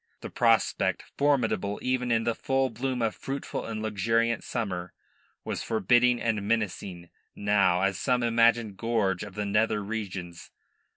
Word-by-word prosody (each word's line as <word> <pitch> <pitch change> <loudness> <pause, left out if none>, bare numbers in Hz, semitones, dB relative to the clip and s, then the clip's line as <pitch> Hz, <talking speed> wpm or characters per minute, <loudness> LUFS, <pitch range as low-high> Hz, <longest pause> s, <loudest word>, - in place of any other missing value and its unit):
The - - -7
prospect, - - +2
formidable 115 -8 +1
even 125 -1 0
in 115 -1 +2
the 115 - +1
full 135 +3 0
bloom 125 +1 -2
of 110 - +1
fruitful 135 +1 -5
and 110 -1 -4
luxuriant 115 +2 0
summer, 90 -7 -4 0.5
was - - -3
forbidding 120 +2 +3
and 110 -3 0
menacing 100 -5 -2 0.2
now 100 -3 +2
as 95 -1 0
some 125 -2 +1
imagined 115 -3 +3
gorge 110 -6 0
of 105 -3 -8
the 105 0 -2
nether 105 +1 +1
regions. 95 -5 -6
110 Hz, 140 wpm, -27 LUFS, 100-120 Hz, 0.5 s, forbidding